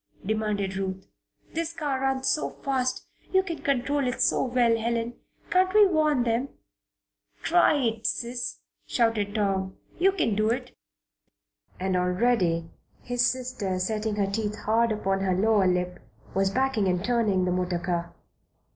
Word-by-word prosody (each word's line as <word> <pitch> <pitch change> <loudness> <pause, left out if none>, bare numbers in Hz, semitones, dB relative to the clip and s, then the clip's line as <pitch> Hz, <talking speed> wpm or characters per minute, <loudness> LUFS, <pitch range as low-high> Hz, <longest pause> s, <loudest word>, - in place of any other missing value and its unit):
demanded 210 -2 -1
Ruth. 190 -1 -4 0.5
"This 335 0 -2
car 290 -5 -2
runs 265 0 0
so 300 - +1
fast 255 -2 -2 0.3
you 380 0 +4
control 285 -5 -1
it 250 - -2
so - - +2
well, 240 -2 +3
Helen. 230 +1 -1 0.4
Can't 370 0 +3
we 425 -1 +8
warn 305 -8 +2
them?" 235 +3 0 0.9
"Try 345 -2 +4
it, 230 -5 0
Sis!" 240 +1 -3 0.3
shouted 225 -3 +1
Tom. 195 -2 -1 0.2
"You 385 +3 +5
can 330 - 0
do 215 +2 +1
it!" 250 +1 -3 1.0
And 190 0 0
already 180 -3 +1 0.3
his 245 0 0
sister, 250 -7 -2
setting 215 +3 -1
her 205 -1 +1
teeth 210 +1 -2
hard 230 +1 +3
upon 195 -2 0
her 190 -1 +1
lower 205 0 +3
lip, 180 0 0 0.3
was 195 0 +2
backing 255 -3 +1
and 180 +1 0
turning 215 -6 +2
the 180 - 0
motor 180 0 0
car. 170 -1 -2
225 Hz, 145 wpm, -26 LUFS, 195-255 Hz, 1.0 s, we